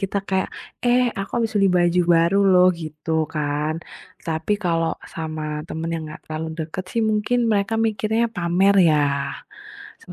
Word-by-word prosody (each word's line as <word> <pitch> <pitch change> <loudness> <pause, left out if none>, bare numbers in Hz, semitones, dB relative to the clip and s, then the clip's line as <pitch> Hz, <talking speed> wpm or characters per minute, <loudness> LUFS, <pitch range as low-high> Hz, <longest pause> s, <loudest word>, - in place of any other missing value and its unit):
kita 195 0 -1
kayak, 190 -1 0 0.4
"Eh 245 +1 +4 0.2
aku 195 - -4
habis 225 -2 -1
beli 195 -1 +4
baju 175 +1 +3 0.2
baru 170 +4 +3
loh," 180 -1 +6
gitu 155 0 -7 0.2
kan. 150 +1 -1 0.5
Tapi 160 +4 -1
kalau 165 -2 +1 0.2
sama 155 -1 -4 0.3
teman 165 +1 -4
yang 165 - -3
enggak 155 - -9
terlalu 155 +1 -4
dekat 165 +4 -5
sih, 230 - 0
mungkin 215 +3 +1
mereka 205 +1 +1
mikirnya, 220 +2 0
"Pamer 180 +3 +3
ya." 155 -1 +3 1.0
Sem - - -11
175 Hz, 155 wpm, -22 LUFS, 160-200 Hz, 1.0 s, loh